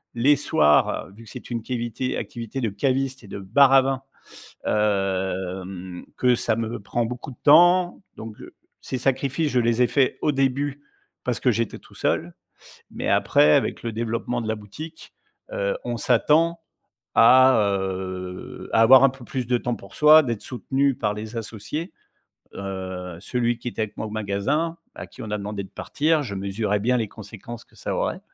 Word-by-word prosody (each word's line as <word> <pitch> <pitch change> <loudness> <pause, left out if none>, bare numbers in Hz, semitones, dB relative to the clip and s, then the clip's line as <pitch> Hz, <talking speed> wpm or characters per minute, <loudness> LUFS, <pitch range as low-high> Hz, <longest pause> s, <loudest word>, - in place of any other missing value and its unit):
les 135 +5 +4
soirs, 75 - +2
vu 115 +3 -14
que - - -14
c'est - - -10
une 115 -1 -2
cavité 120 +1 -3
activité 120 +2 -5
de 115 - 0
cavistes 130 +5 -1
et - - -12
de 100 - -7
bars 130 +8 +4
à 135 - +8
vins. 135 0 -2 0.6
Hem 95 -3 -2
que 125 -1 +3
ça 110 -2 0
me 115 -1 -3
prend 120 +4 -2
beaucoup 125 +3 -6
de 120 - -15
temps. 175 +5 +5
Donc 110 -1 -9
heu, - - -12 0.3
ces 130 - -4
sacrifices, 140 +4 0
je 125 - +3
les 120 +1 +2
ai 125 - +5
faits 135 -3 +1
au 150 - +2
début 135 +1 -1 0.4
parce 125 -2 -2
que 125 - +3
j'étais 115 0 -2
tout - - -19
seul. - - -1 0.6
Mais - - -5
après, 75 +1 +4
avec - - 0
le 115 -1 -3
développement 115 +2 -2
de 110 - -5
la 110 - 0
boutique, 155 +11 -10 0.4
heu, - - -1
on - - -2
s'attend 165 +2 +2 0.6
à, 130 0 +7 0.2
heu, 95 -1 -6
à 115 - +5
avoir 130 +3 +8
un 135 - +7
peu 130 -1 -12
plus 130 -1 -3
de 125 0 +2
temps 120 0 -2
pour - - -14
soi, 155 +1 +7
d'être 115 -5 -3
soutenu 135 +3 -1
par 105 -2 -1
les 110 +2 -6
associés. 115 - -5 0.6
Heu, 95 -2 -6
celui 120 +1 -1
qui 120 - -5
était 115 - -3
avec 105 - -5
moi - - -3
au - - -7
magasin, 110 +11 -1 0.2
à - - -8
qui - - -12
on 110 - -6
a 105 - -1
demandé 100 0 -4
de - - -13
partir, 155 +1 0
je 105 -8 -5
mesurais 100 +1 -1
bien 125 +4 +2
les 110 -3 -2
conséquences 110 +3 -10
que - - -26
ça - - -4
aurait. - - -2
115 Hz, 185 wpm, -24 LUFS, 105-135 Hz, 0.6 s, à